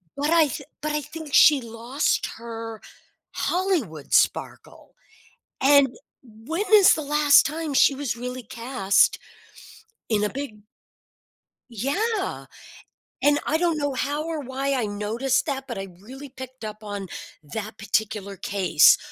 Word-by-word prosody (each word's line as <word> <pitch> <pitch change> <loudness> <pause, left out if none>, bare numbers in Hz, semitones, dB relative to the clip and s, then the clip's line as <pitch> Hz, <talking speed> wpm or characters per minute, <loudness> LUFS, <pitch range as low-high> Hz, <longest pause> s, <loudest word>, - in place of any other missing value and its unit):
but 290 +2 -1
I 330 -2 +5
th 305 +2 -5 0.2
but 305 +1 -2
I 300 - 0
think 315 +1 -9
she 290 -1 +6
lost 235 +4 -1
her 225 -1 -7 0.5
Hollywood 315 - -1
sparkle. - - 0 0.7
And 280 0 +6 0.3
when 255 - -5
is 410 -3 +8
the 315 - -3
last 295 0 +5
time 310 -1 -3
she 275 - +5
was 270 -3 -3
really 250 +1 -6
cast 230 -3 +1 0.9
in 210 -2 +1
a - - -1
big 265 -5 -6 1.1
Yeah, 380 - -2 0.8
and 290 0 +4
I 310 - +1
don't 335 -1 +1
know 285 -2 -1
how 285 +4 -2
or 325 -1 -3
why 270 0 -2
I 250 -4 0
noticed 225 +6 -1
that, 270 -3 -4
but 235 - -5
I 195 0 -5
really 265 +6 -10
picked 260 -2 -10
up 215 0 -8
on 205 -2 -5 0.4
that 215 +7 -7
particular 210 -2 -2
case, 195 -6 +4
260 Hz, 140 wpm, -24 LUFS, 220-295 Hz, 1.1 s, is